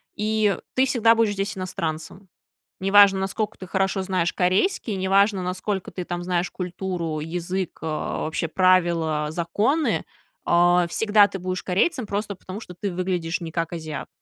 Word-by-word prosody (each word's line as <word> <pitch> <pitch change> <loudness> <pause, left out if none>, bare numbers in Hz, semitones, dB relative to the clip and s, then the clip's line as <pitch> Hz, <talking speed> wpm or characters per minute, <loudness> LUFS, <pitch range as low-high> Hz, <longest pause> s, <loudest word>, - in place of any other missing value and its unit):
и 215 -1 +1 0.2
ты 260 +1 +3
всегда 230 -3 +4
будешь 225 -2 +2
здесь 195 0 -3
иностранцем. 175 +1 -5 0.5
Неважно, 195 0 +6
наскока 210 +2 -2
ты 185 - -8
хорошо 190 +1 0
знаешь 185 -2 0
корейский, 200 - +1
неважно, 195 +1 +2
насколько 185 +1 -3
ты 180 - -5
там 175 0 -4
знаешь 180 0 -1
культуру, 175 -3 -4
язык, 175 +3 -4
э, - - -4
вообще 155 +1 -2
правила, 170 -4 +2
законы. 210 - 0 0.4
Э, 175 0 +4
всегда 205 +1 +4
ты 195 - -6
будешь 185 +1 -3
корейцем 220 - 0
просто 205 0 -3
потому, 185 +3 -8
что 180 - -10
ты 195 +1 -4
выглядишь 180 -1 -2
не 165 -2 -6
как 165 0 -2
азиат. 160 -3 -5
185 Hz, 150 wpm, -24 LUFS, 175-205 Hz, 0.5 s, Неважно